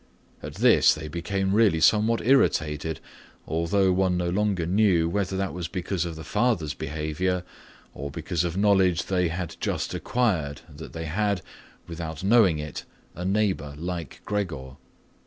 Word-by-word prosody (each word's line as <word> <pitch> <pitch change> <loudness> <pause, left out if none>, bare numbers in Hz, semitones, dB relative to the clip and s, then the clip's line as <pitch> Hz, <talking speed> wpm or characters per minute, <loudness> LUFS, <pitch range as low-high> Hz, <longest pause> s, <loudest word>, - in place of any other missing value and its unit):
At - - -8
this - - +5
point 75 - -8
they - - -5
became 95 +4 -1
really 105 -6 +4
somewhat 110 +8 +3
irritated, 80 - +2 0.5
although 90 +4 +1
one 90 -1 +2
no 85 -1 -1
longer 100 -3 0
knew 90 -2 +3
whether 95 +1 -1
that 95 0 -2
was 85 -1 -4
because 90 0 -2
of 85 -2 -5
the 80 - -8
father's 105 -5 0
behaviour 80 +4 -2 0.5
or 70 +2 -6
because 80 +3 -2
of 85 +1 -3
knowledge 95 -4 +3
they 90 -2 +1
had 85 0 -4
just - - -2
acquired 85 - -1
that 75 -4 -10
they 80 0 -5
had, 100 +2 -1 0.4
without 80 -1 -6
knowing 100 -5 +5
it, 75 -2 -6 0.3
a 90 - -6
neighbour 95 -7 0
like 85 -1 -5
Gregor. 75 -11 -3
90 Hz, 155 wpm, -26 LUFS, 80-100 Hz, 0.5 s, this